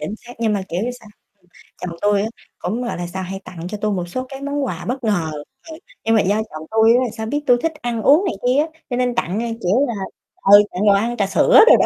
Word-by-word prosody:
Chính 155 +8 -4
xác, 240 +2 -13
nhưng 225 -2 +1
mà 200 -2 -1
kiểu 175 - -2 0.2
sao? 220 - -15 0.7
Chồng 175 -2 -5
tui 205 -1 +3
á 210 - -1 0.3
cũng, 220 +7 -2
gọi 235 - -3
là, 175 0 -4
sao, 190 +2 -5
hay 190 +1 -6
tặng 170 -1 -8
cho 210 - -5
tui 215 - +1
một 180 -3 -2
số 255 +9 -4
cái 270 0 -8
món 285 0 -2
quà - - -5
bất 250 +1 -3
ngờ. 175 -8 0 0.4
Ừm. 315 - -9 0.3
Nhưng 225 - +3
mà 215 - +5
do 200 +2 +1
chồng 155 0 -8
tui 220 +1 +5
á - - +5
là 245 - -1
sao 220 - -3
biết 290 +7 -1
tui 245 -1 +6
thích 325 -1 0
ăn 235 -2 -2
uống 300 - +5
này 365 - -1
kia 255 +3 +3
á, 320 +1 -2
cho 245 - -1
nên 250 -1 0
tặng, 195 -2 -1
a, - - -2
kiểu 210 +11 +2
là, 240 - -2 0.6
ừ, 205 0 +10
tặng 180 - -4
đồ 200 - +7
ăn, 230 +5 0
trà 200 - +1
sữa - - +6
đồ - - +9
đó - - +3
220 Hz, 280 wpm, -20 LUFS, 195-250 Hz, 0.7 s, ừ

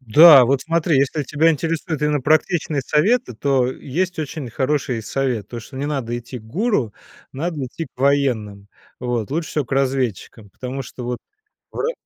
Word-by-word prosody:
Да, 135 +3 +8
вот 135 0 +1
смотри, 165 -2 +1
если 140 +3 +1
тебя 155 +4 +3
интересуют 160 +1 -2
именно 150 -1 +1
практичные 155 0 +1
советы, 150 - +1
то 135 +1 +1
есть 175 +8 -3
очень 150 -3 -4
хороший 130 -1 -1
совет: 120 -4 -2
то, 120 - -6
что 130 +4 -12
не 135 - -3
надо 130 -5 -2
идти 120 +1 -8
к - - -15
гуру, 140 - -1 0.4
надо 150 -1 -3
идти 165 +6 -6
к 130 - -19
военным, 120 -8 +1 0.3
вот, 120 -3 -2
лучше 160 +2 -2
всего 150 - -1
к - - -9
разведчикам, 130 -6 -1
потому 130 +4 -6
что 125 0 -9
вот 125 0 -3 0.5
в - - -9
ро 470 +2 0
135 Hz, 175 wpm, -21 LUFS, 125-155 Hz, 0.5 s, Да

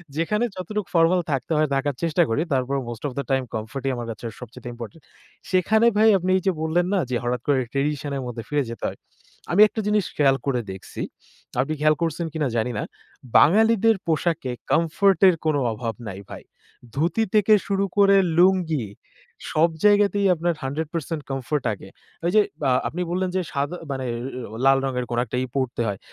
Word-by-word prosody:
যেখানে 210 +9 +1
যতটুকু 200 +2 -4
ফরমাল 170 +2 +4
থাকতে 135 +3 -2
হয়, 155 - +3
থাকার 140 0 -1
চেষ্টা 170 +1 +3
করি। 115 +7 +1
তারপরও 135 +1 0
most 115 0 -8
of - - -4
the 140 - -1
time, 135 -1 +2
comfort 110 +5 -5
ই - - +3
আমার 120 -1 -5
কাছে 110 +1 -9
সবচাইতে 125 0 -10
ইম্পোর্টেন্ট। 120 +7 -9 0.5
সেখানে 220 +5 +3
ভাই 220 +1 +6
আপনি 185 +1 -3
এই - - -2
যে - - +5
বললেন 165 +3 +1
না? 195 - +3
যে 125 - -1
হঠাৎ 120 0 -1
করে 140 -2 +3
ট্র্যাডিশন 145 +1 -1
এর - - -3
মধ্যে 120 -2 -6
ফিরে 145 -1 +1
যেতে 115 - -8
হয়। - - -11 0.5
আমি 185 +4 +5
একটা 220 - -4
জিনিস 210 -3 +2
খেয়াল 135 -2 +4
করে 125 -3 +1
দেখছি। 95 0 -8 0.6
আপনি 135 +5 +1
খেয়াল 155 0 +4
করছেন 165 0 -1
কিনা, 155 -3 0
জানি 115 +2 0
না। - - -2 0.5
বাঙালিদের 225 +4 +5
পোশাকে 160 -4 0 0.2
কমফোর্ট 175 +4 +3
এর 180 - +5
কোন 155 -1 +2 0.2
অভাব 115 0 -4
নাই 95 0 -7
ভাই। - - -8 0.5
ধুতি 170 +10 +1
থেকে 215 0 +5
শুরু 200 0 +1
করে 200 -1 +6 0.2
লুঙ্গি, 175 - +3 0.7
সব 160 +2 +3
জায়গাতেই 205 -1 +4
আপনার 170 +1 0
100% 160 +3 -3
কমফোর্ট 135 +1 -2
আগে। 95 - -11 0.4
ওই 175 - +2
যে 215 - +7 0.2
বা 140 - +1 0.2
আপনি 175 - -4
বললেন 185 +1 0
যে, 185 - +2
সাদা 140 +5 -2 0.2
মানে 135 -1 -3
এ - - -3 0.4
ও - - -7
লাল 135 0 +6
রঙের 125 -2 -2
কোন 120 - -1
একটা 125 +1 -4
ই - - -2
পড়তে 130 -3 -1
হয়। 100 -2 -3
155 Hz, 190 wpm, -23 LUFS, 130-185 Hz, 0.7 s, যে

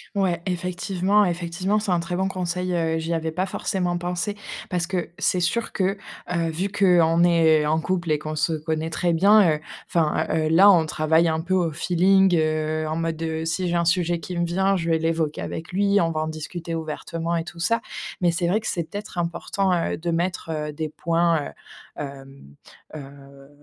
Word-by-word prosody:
Ouais, 180 -4 0
effectivement 185 +2 +1
effectivement, 180 +3 -1
c'est 210 - -4
un 175 - +2
très 170 +1 -3
bon 190 +1 0
conseil, 180 -1 -2
heu, 160 -1 0
j'y 165 +1 -2
avais 160 -1 -2
pas 185 +4 -2
forcément 180 -3 -1
pensé 180 +3 -3 0.3
parce 175 -2 0
que 180 -1 -3
c'est 180 - +1
sûr 200 +7 0
que, 195 +1 0 0.3
heu, 170 -2 0
vu 180 +5 -2
qu'on 175 -4 +4
est 160 -3 +4
en 155 +2 +2
couple 175 -2 -1
et 150 - +2
qu'on 155 +1 -5
se 155 +2 +1
connaît 160 +1 -3
très 175 +1 0
bien, 195 -1 +5
heu, - - -6 0.3
enfin, 160 -3 +1
heu - - 0
heu, 155 - 0
là 185 +5 +7
on 170 -5 +5
travaille 155 +2 +2
un 160 0 0
peu 185 +3 -1
au 175 -3 +1
feeling, 180 +3 +3
heu, 155 0 0
en 155 - -2
mode, 165 -1 -2
heu, 160 0 -2
si 180 +2 -1
j'ai 175 - -1
un 170 0 +1
sujet 175 0 +1
qui 180 +1 -6
me 170 - +1
vient, 190 +3 +1
je 170 -2 -3
vais 165 -1 +2
l'évoquer 160 -2 -1
avec 160 +2 -6
lui. 200 +2 +2
On 165 -1 +1
va 155 - -2
en 155 - -2
discuter 165 +2 -5
ouvertement 165 +1 -3
et 165 - -1
tout 170 - -11
ça, 230 +7 +1 0.4
mais 175 - +4
c'est 170 +1 0
vrai 195 +5 +2
que 220 - -6
c'est 170 - -1
peut-être 205 +3 -8
important, 180 +2 -1
heu, 170 - 0
de 170 +1 -3
mettre 170 0 -2 0.2
des 155 0 -3
points, 165 -1 +1
heu, - - -8 0.5
hem, 135 - -11 0.4
heu, 140 -1 -12
170 Hz, 205 wpm, -23 LUFS, 160-180 Hz, 0.5 s, là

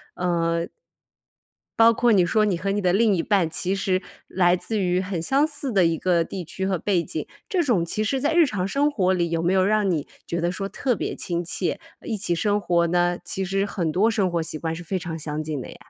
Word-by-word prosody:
嗯 170 -1 0 1.1
包 230 0 +7
括 240 0 +3
你 185 -4 +4
说 215 +5 +2
你 195 -4 0
和 195 +3 -2
你 205 - 0
的 180 -3 +2
另 215 0 +3
一 170 - 0
半 195 -6 +2
其 190 +3 -1
实 185 -1 0 0.3
来 175 -1 +3
自 215 +4 -3
于 180 -1 +1
很 185 -3 -3
相 275 - +2
似 290 -4 -4
的 190 -3 +4
一 165 -1 +1
个 175 -1 +2
地 180 +1 -6
区 190 +4 -4
和 190 -1 0
背 180 0 0
景， - - -5 0.2
这 380 -5 +1
种 240 - +2
其 170 +5 -3
实 260 +5 -1
在 295 +4 +1
日 335 0 +6
常 200 -9 -2
生 280 +8 +2
活 190 -10 +1
里 170 -2 0
有 165 0 -1
没 175 +2 +1
有 190 -1 +4
让 210 -1 +2
你 155 -4 -2 0.2
觉 170 - -3
得 170 +1 0
说 195 +1 -4
特 255 +2 -1
别 - - -3
亲 175 -1 -3
切， 170 - -2 0.2
呃， - - -14
一 225 - -1
起 190 -4 -1
生 205 +4 +1
活 170 -3 +2
呢 175 +1 +1
其 190 +2 -3
实 195 +1 0
很 175 -6 -2
多 200 +7 +3
生 200 -5 +1
活 170 -1 0
习 160 -1 -4
惯 160 +1 -3
是 170 +2 -7
非 190 +4 -1
常 170 -2 -5
相 150 0 -4
近 150 -3 -4
的 - - -8
呀？ - - -11
185 Hz, 270 characters per minute, -24 LUFS, 170-210 Hz, 1.1 s, 包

